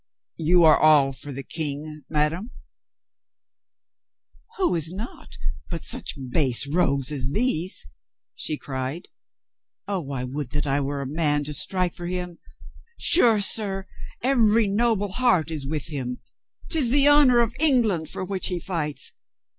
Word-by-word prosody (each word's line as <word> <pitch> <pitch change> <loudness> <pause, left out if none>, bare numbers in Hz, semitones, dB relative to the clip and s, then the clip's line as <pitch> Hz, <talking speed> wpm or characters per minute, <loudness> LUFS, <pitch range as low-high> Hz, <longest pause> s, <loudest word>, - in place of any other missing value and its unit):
"You 170 +2 +4
are 155 -1 +6
all 145 -3 +5
for 130 +3 -7
the 135 +1 -6
King, 150 -1 -4
madame?" 160 +8 0 2.1
"Who 375 -2 +1
is 165 -1 0
not 190 - -9 0.3
but - - -4
such - - -4
base 130 -3 +1
rogues 140 -3 0
as 135 -3 -2
these?" 185 - +1 0.5
she 155 - -4
cried. 135 +5 -5 0.8
"Oh, 180 -9 -3
I 130 -2 -3
would 130 +1 -4
that 145 0 -1
I 140 0 +1
were 140 0 -3
a - - -6
man 145 0 +1
to 150 +1 -4
strike 175 +5 +1
for 175 - -6
him. 180 -1 -4 0.6
Sure, 225 -3 +6
sir, 195 -1 +1 0.4
every 230 -4 +3
noble 205 -1 0
heart 185 - +2
is 145 -4 -5
with 150 -1 -2
him. 125 -5 -4 0.5
'Tis 300 -8 +4
the 280 +3 +4
honor 290 -4 +6
of 235 -1 +1
England 225 - +2
for 185 - -4
which 190 0 -1
he 180 -2 -2
fights. 150 -7 -3
165 Hz, 145 wpm, -24 LUFS, 145-205 Hz, 2.1 s, are